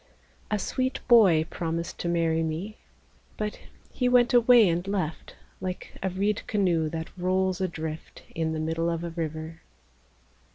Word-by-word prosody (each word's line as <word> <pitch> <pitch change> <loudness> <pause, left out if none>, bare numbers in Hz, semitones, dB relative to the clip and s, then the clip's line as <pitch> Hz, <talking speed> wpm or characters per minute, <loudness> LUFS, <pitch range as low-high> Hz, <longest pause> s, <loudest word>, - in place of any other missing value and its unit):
A 210 - +1
sweet 255 +6 -2
boy 195 -10 +6
promised 165 0 -3
to - - -3
marry 165 -1 +1
me, 165 +7 -4 0.6
But 210 -1 -3 0.3
he 250 -1 0
went 245 -1 +4
away 240 -2 +7
and 175 +2 -1
left 185 -6 -3 0.2
Like 185 -1 -6
a 190 - 0
reed 200 +3 0
canoe 175 -6 +1
that 160 0 -6
rolls 185 +1 0
adrift 160 -3 -5
In 160 -1 -1
the 155 - -3
middle 165 +2 -1
of 165 0 -2
a 170 - -4
river. 160 0 -5
175 Hz, 150 wpm, -27 LUFS, 160-205 Hz, 0.6 s, away